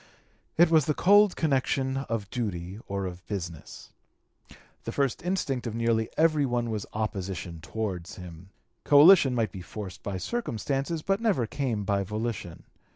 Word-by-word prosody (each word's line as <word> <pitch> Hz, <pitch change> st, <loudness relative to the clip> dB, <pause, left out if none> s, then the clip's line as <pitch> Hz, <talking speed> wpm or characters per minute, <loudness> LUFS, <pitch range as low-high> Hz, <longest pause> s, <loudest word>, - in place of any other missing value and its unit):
It 170 Hz, 0 st, +5 dB
was 160 Hz, -4 st, +4 dB
the 150 Hz, -, +1 dB
cold 205 Hz, +1 st, +5 dB
connection 135 Hz, -3 st, 0 dB
of 115 Hz, -7 st, -3 dB
duty 95 Hz, -4 st, -4 dB
or 100 Hz, -1 st, -3 dB
of 90 Hz, 0 st, -7 dB
business. 85 Hz, -6 st, -7 dB, 0.9 s
The -, -, -4 dB
first 135 Hz, -4 st, 0 dB
instinct 145 Hz, -9 st, -1 dB
of 110 Hz, -, -4 dB
nearly 115 Hz, -1 st, +1 dB
every 155 Hz, -2 st, +3 dB
one 120 Hz, -3 st, -1 dB
was 105 Hz, -2 st, -4 dB
opposition 95 Hz, -5 st, -4 dB
towards 95 Hz, -1 st, -4 dB
him; 90 Hz, 0 st, -11 dB, 0.3 s
coalition 145 Hz, -2 st, +7 dB
might 110 Hz, -5 st, 0 dB
be 95 Hz, -, -8 dB
forced 95 Hz, 0 st, -8 dB
by 100 Hz, -2 st, -4 dB
circumstances 145 Hz, -, -2 dB
but 195 Hz, +2 st, 0 dB
never 200 Hz, -, +2 dB
came 120 Hz, -4 st, -2 dB
by 100 Hz, 0 st, 0 dB
volition. 105 Hz, -3 st, -4 dB
115 Hz, 150 wpm, -27 LUFS, 95-145 Hz, 0.9 s, coalition